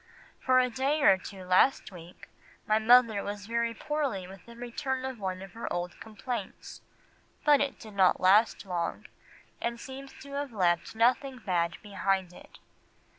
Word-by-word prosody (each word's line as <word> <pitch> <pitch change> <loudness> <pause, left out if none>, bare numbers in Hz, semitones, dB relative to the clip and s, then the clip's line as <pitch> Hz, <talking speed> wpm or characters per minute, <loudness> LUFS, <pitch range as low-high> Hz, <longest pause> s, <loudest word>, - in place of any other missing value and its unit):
"For 255 -1 +3
a 255 0 +4
day 275 +5 0
or 195 - +7
two 190 0 -9
last 185 +7 +3
week 175 -1 -13 0.4
my 215 0 +3
mother 225 -2 +5
was 205 0 -6
very 230 +1 -1
poorly 275 -10 -2
with 195 +2 -13
a 235 - -12
return 255 +2 -4
of 260 -3 -5
one 190 -1 -4
of 195 - -12
her 230 - -6
old 175 0 -4
complaints, 220 0 -7 0.6
but 295 -2 +6
it 280 -1 -1
did 215 -2 -11
not 190 -2 +4
last 205 +4 +4
long, 175 -3 -3 0.6
and 235 0 -2
seems 270 +2 -9
to 280 - -12
have 280 -1 -4
left 180 -2 0
nothing 255 +3 +2
bad 170 -7 -1
behind 195 -3 -1
it. - - -15
220 Hz, 165 wpm, -29 LUFS, 190-255 Hz, 0.6 s, or